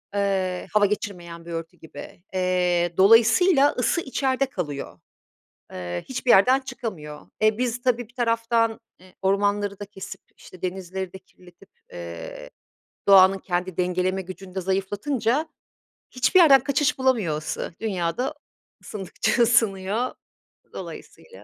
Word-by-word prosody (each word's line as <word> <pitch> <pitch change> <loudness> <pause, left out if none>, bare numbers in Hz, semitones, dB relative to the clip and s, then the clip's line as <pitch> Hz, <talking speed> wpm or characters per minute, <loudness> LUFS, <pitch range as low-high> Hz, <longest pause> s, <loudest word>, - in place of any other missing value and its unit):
Iıı, 190 -2 -1
hava 210 -1 +5
geçirmeyen 175 -5 -4
bir 170 - -8
örtü 165 0 -6
gibi. 160 +2 -12
Eee, 180 -2 +1
dolayısıyla 240 - +6
ısı 255 +7 0
içeride 265 -2 0
kalıyor, 145 - -6 0.7
ııı, 90 -1 -4
hiçbir 250 -1 -3
yerden 255 +8 +6
çıkamıyor. 215 - -7 0.2
E, 215 +1 +3
biz 245 -1 -1
tabii 245 -2 0
bir 240 - -25
taraftan, 230 -1 +1 0.2
e, 185 0 -18
ormanları 200 +1 +1
da 205 - -6
kesip 195 -1 -9 0.2
işte 185 - -15
denizleri 185 0 -4
de 190 - -9
kirletip, 180 +1 -20 0.2
eee, 85 -1 -8 0.6
doğanın 195 0 +7
kendi 180 -1 -3
dengeleme 180 +1 0
gücünü 185 0 -10
de 190 - -2
zayıflatınca 215 - -1 0.6
hiçbir 255 +9 +3
yerden 280 -6 +7
kaçış 280 0 +1
bulamıyor 225 -13 +1
ısı, 155 +2 -5
dünyada 195 - -2 0.5
ısındıkça 210 +3 -2
ısınıyor, 220 0 +1 0.6
dolayısıyla 480 - -10
195 Hz, 125 wpm, -24 LUFS, 180-240 Hz, 0.7 s, doğanın